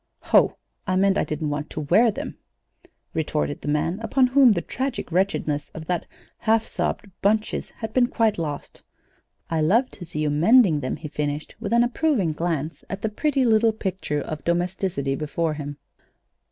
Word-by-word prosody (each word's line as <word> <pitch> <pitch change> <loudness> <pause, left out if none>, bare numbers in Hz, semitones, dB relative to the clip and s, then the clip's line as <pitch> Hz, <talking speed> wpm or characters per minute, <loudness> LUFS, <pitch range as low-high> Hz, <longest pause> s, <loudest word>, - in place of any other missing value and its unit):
"Ho! - - +5 0.3
I 185 - +1
meant 195 +1 +3
I - - +2
didn't 155 -1 -3
want 150 +1 -3
to 155 - -5
wear 185 +11 +4
them," 210 - -5 0.8
retorted 150 -2 -1
the - - -7
man, 150 +6 0
upon 255 +3 +2
whom 255 -2 +6
the 170 - -1
tragic 260 -7 -3
wretchedness 160 -5 0
of 160 - -7
that 175 0 -2 0.3
half 225 0 +2
sobbed 200 - -3
"bunches" 215 +2 +1
had 220 -1 -7
been 250 -1 +4
quite 225 -6 +1
lost. 150 -3 -5 0.7
"I 160 -1 +1
love 225 +12 +3
to 180 - -10
see 155 -2 -4
you 150 -1 +1
mending 175 - +5
them," 130 -2 -2
he 155 - -7
finished, 145 0 -3
with 215 -2 -4
an 235 +1 +5
approving 245 - +1
glance 160 -1 -3
at 195 +1 -5
the 220 - +1
pretty 270 +4 +1
little 225 0 +4
picture 190 -8 -3
of 155 0 -6
domesticity 170 -5 -1
before 155 +3 -1
him. 145 -1 -6
180 Hz, 175 wpm, -24 LUFS, 150-225 Hz, 0.8 s, whom